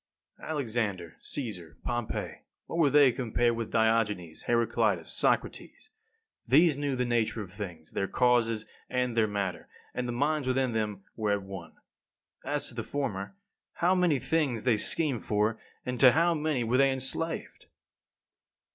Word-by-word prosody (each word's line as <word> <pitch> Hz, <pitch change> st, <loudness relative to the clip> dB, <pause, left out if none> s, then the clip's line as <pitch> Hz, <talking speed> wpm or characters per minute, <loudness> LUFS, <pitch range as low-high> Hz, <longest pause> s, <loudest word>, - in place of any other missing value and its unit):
3. -, -, -11 dB
Alexander, 110 Hz, -, -2 dB
Caesar, 90 Hz, -, -6 dB
Pompey, 120 Hz, -2 st, -3 dB, 0.3 s
what 170 Hz, -, -4 dB
were 150 Hz, -4 st, +5 dB
they 145 Hz, -2 st, +6 dB
compared 120 Hz, -1 st, 0 dB
with 115 Hz, -1 st, -4 dB
Diogenes, 105 Hz, -7 st, +1 dB
Heraclitus, 115 Hz, -6 st, +1 dB
Socrates? -, -, -1 dB, 0.6 s
These 150 Hz, +5 st, +5 dB
knew 145 Hz, -1 st, -1 dB
the 125 Hz, 0 st, 0 dB
nature 120 Hz, -2 st, 0 dB
of 95 Hz, -, -12 dB
things, 90 Hz, -7 st, -7 dB
their 95 Hz, -, -1 dB
causes 115 Hz, -3 st, +2 dB, 0.2 s
and 125 Hz, -2 st, -1 dB
their 110 Hz, -2 st, +3 dB
matter, 100 Hz, -3 st, -3 dB, 0.3 s
and 125 Hz, 0 st, -2 dB
the -, -, -2 dB
minds 145 Hz, +3 st, 0 dB
within 130 Hz, -1 st, +1 dB
them 105 Hz, -3 st, -2 dB
were 105 Hz, -2 st, 0 dB
at 100 Hz, -1 st, -2 dB
one. 95 Hz, -3 st, -9 dB, 0.7 s
As -, -, -2 dB
to -, -, -8 dB
the -, -, -3 dB
former, 135 Hz, -, -4 dB, 0.4 s
how 175 Hz, +2 st, +2 dB
many 180 Hz, -5 st, +3 dB
things 135 Hz, -5 st, 0 dB
they 120 Hz, -4 st, +3 dB
schemed 140 Hz, +2 st, 0 dB
for, 105 Hz, +1 st, 0 dB, 0.3 s
and 125 Hz, -1 st, -3 dB
to 130 Hz, -2 st, +8 dB
how 170 Hz, +2 st, +3 dB
many 150 Hz, -5 st, 0 dB
were 120 Hz, +2 st, +1 dB
they 135 Hz, 0 st, +5 dB
enslaved! 135 Hz, +5 st, -2 dB
120 Hz, 155 wpm, -29 LUFS, 105-135 Hz, 0.7 s, to